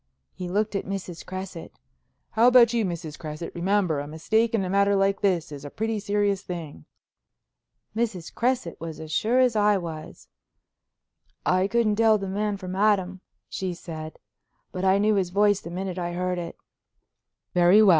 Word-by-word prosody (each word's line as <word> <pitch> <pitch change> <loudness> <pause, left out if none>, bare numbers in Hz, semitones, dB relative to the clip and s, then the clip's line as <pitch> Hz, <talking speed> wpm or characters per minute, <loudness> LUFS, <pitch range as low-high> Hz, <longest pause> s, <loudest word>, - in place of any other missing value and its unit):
He 180 -1 -6
looked 210 +3 0
at 195 - -1
Mrs. 185 -3 -5
Cresset. 185 -2 -7 0.6
"How 225 +2 +4
about 245 -2 +7
you, 230 -2 +2
Mrs. 170 -5 -4
Cresset? 155 +1 -6
Remember, 180 -3 +1
a 145 - -5
mistake 220 +9 +1
in 195 -4 0
a - - -3
matter 200 +1 +3
like 195 0 +2
this 180 -7 +1
is 140 -1 -8
a 145 - -6
pretty 220 +5 -2
serious 205 -1 0
thing." 165 - -7 1.1
Mrs. 220 -7 -2
Cresset 240 -8 -1
was 165 -2 -6
as 160 -1 -8
sure 225 +10 +2
as 250 -3 +4
I 210 -1 +4
was. 165 -2 -7 1.2
"I 185 +1 +3
couldn't 220 -1 +1
tell 220 -1 +5
the 195 -1 -5
man 205 +1 -1
from 185 -1 -6
Adam," 190 -2 +2 0.3
she 185 -2 -3
said, 160 -2 -8 0.5
"but 185 - -4
I 190 +1 +4
knew 210 +2 +3
his 190 -3 +1
voice 205 +1 +3
the - - -8
minute 185 +1 -4
I 175 0 -3
heard 180 0 -1
it." 170 -1 -6 1.0
"Very 180 +4 +6
well. 205 - +6
190 Hz, 175 wpm, -25 LUFS, 175-210 Hz, 1.2 s, about